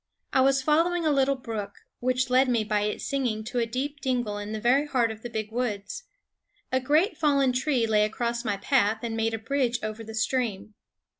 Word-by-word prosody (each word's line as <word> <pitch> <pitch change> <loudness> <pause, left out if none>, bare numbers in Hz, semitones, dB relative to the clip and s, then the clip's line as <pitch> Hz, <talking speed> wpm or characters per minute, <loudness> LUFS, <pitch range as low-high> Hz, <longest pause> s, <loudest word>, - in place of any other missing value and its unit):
I 260 - +4
was 270 0 +3
following 330 +4 +2
a 310 - +3
little 275 -1 +3
brook, 220 -5 -6 0.2
which 255 +1 0
led 260 +1 +4
me 235 -3 +2
by 210 -1 0
its 210 0 -2
singing 245 -6 -1
to 240 +3 -3
a 230 - 0
deep 275 +5 -3
dingle 245 -6 -1
in 205 +1 -6
the 220 - -3
very 265 +6 +3
heart 240 -5 +1
of 220 0 -9
the 240 - -6
big 220 -1 -4
woods. 235 - -3 0.7
A 260 - +2
great 305 - +2
fallen 280 -4 +3
tree 255 -2 +1
lay 215 -1 +3
across 235 +2 -2
my 205 -4 -1
path 220 -1 +1
and 230 -1 -3
made 225 0 0
a - - -3
bridge 245 +1 0
over 215 +1 -4
the 220 0 -8
stream. 220 -3 -1
240 Hz, 210 wpm, -26 LUFS, 220-270 Hz, 0.7 s, I